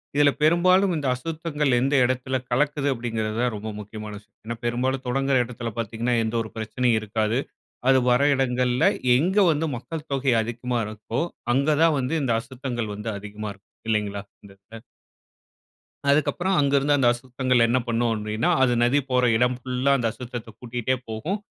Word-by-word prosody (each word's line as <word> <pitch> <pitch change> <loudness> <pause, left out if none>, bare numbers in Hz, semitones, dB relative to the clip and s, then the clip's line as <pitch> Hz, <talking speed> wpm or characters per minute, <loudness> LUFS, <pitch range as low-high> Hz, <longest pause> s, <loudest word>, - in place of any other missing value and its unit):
இதில 145 0 +5
பெரும்பாலும் 185 +4 +4
இந்த 145 -3 -2
அசுத்தங்கள் 150 -1 -1
எந்த 135 +3 0
இடத்துல 130 +1 0
கலக்குது? 145 +2 +1
அப்பிடிங்கிறது 115 -3 -3
தான் 125 -2 +1
ரொம்ப 110 +1 -5
முக்கியமான 105 0 -8
விஷயம். 105 0 -29
ஏன்னா 120 +1 -4
பெரும்பாலும் 130 +2 -1
தொடங்கிற 135 +1 +1
இடத்துல 115 -1 -6
பார்த்தீீங்கன்னா 115 +2 -1
எந்த 110 +1 -1
ஒரு 110 - -7
பிரச்சனையும் 110 +1 +1
இருக்காது. 110 +2 -1 0.5
அது 130 -1 +5
வர 125 +3 +4
இடங்கள்ல 125 -1 +1 0.3
எங்கே 190 +8 +3
வந்து 160 +1 0
மக்கள் 155 +6 -7
தொகை 135 -2 +2
அதிகமா 120 +1 -3
இருக்கோ! 110 +7 -4 0.3
அங்க 140 +3 +1
தான் 165 -2 +4
வந்து 135 +5 -1
இந்த 120 -4 +1
அசுத்தங்கள் 120 -4 -5
வந்து 105 +2 -5
அதிகமா 105 +1 -7
இருக்கும் 100 +1 -27 0.2
இல்லேங்களா! 105 -2 -1 0.2
இந்த 100 - -13
இடத்துல 110 +3 -13 1.3
அதுக்கப்பறம் 175 +6 +2
அங்கருந்து 140 0 +3
அந்த 130 -3 +3
அசுத்தங்கள் 125 0 +1
என்ன 125 +2 +2
பண்ணும் 115 0 +1
அப்பிடின்னா, 110 +8 -1
அது 125 -2 +3
நதி 125 +4 +3
போற 125 0 +2
இடம் 125 +1 +2
ஃபுல்லா 130 +2 0
அந்த 120 -3 0
அசுத்தத்த 120 -1 -8
கூட்டிகிட்டே 125 +1 -2
போகும். 155 - -3
125 Hz, 160 wpm, -24 LUFS, 115-140 Hz, 1.3 s, இதில